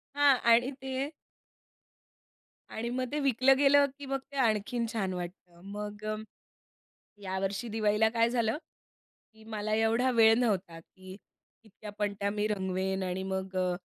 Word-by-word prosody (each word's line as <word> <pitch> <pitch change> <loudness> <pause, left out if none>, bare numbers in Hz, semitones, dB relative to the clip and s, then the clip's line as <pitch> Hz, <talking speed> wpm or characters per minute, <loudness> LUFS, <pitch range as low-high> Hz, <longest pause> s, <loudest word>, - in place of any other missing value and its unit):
हां. 285 -2 +5
आणि 240 +3 +4
ते 265 +1 -3 1.6
आणि 235 +2 -4
मग 255 +1 -1
ते 300 - -1
विकलं 270 -1 +4
गेलं, 285 +1 +5
की 280 - -7
मग 270 0 -2
ते 280 - -7
आणखीन 230 0 +1
छान 195 -4 -1
वाटतं. 175 -1 -8
मग 210 0 -6
अ, 215 - -1 1.1
यावर्षी 195 +4 -2
दिवाळीला 215 0 +2
काय 230 0 +2
झालं, 235 +1 0 0.8
की 220 0 -18
मला 215 0 -2
एवढा 225 +3 +2
वेळ 225 -1 +6
नव्हता, 190 -8 -1
की 185 +3 -13 0.5
इतक्या 215 -1 -11
पणत्या 200 -1 -1
मी 210 0 -1
रंगवेन 190 -1 -1
आणि 185 +1 -3
मग 190 0 -4
अ, 180 -1 +1
215 Hz, 145 wpm, -30 LUFS, 190-245 Hz, 1.6 s, वेळ